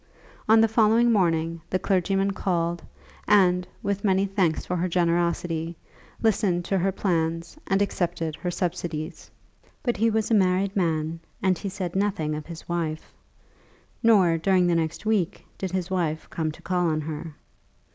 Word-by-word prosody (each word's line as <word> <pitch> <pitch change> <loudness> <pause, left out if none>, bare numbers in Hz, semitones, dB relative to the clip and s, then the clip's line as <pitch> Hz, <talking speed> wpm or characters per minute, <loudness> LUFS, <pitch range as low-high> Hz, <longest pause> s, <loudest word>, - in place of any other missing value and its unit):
On 220 0 +7
the 225 - +5
following 225 +2 +4
morning 165 -5 +1
the 185 - +1
clergyman 195 +1 +1
called, 175 -3 -1 0.5
and, 180 -3 +4 0.2
with 200 0 -1
many 195 -1 +3
thanks 190 -5 0
for 180 - -2
her 180 +1 0
generosity, 170 -1 0 0.5
listened 200 -5 +2
to 195 +1 +1
her 195 +2 +1
plans, 165 -2 -1
and 195 +1 +3
accepted 165 -4 -2
her 180 - -3
subsidies. 170 -3 -4 0.5
But 240 -3 0
he 225 +3 +3
was 220 0 0
a - - +4
married 190 -1 +2
man, 165 -3 0 0.2
and 190 -1 +3
he 200 +3 -5
said 185 -2 -5
nothing 190 -6 0
of 150 0 -5
his 170 -2 -9
wife, 165 -2 -3 0.9
nor 190 -8 +4
during 185 +1 +3
the 175 - +2
next 165 +4 -1
week 210 -6 0
did 190 - -2
his 185 0 -3
wife 160 -4 -1
come 160 -1 -1
to - - -15
call 180 -2 +1
on 155 -1 0
her. 155 0 -6
180 Hz, 160 wpm, -25 LUFS, 165-195 Hz, 0.9 s, On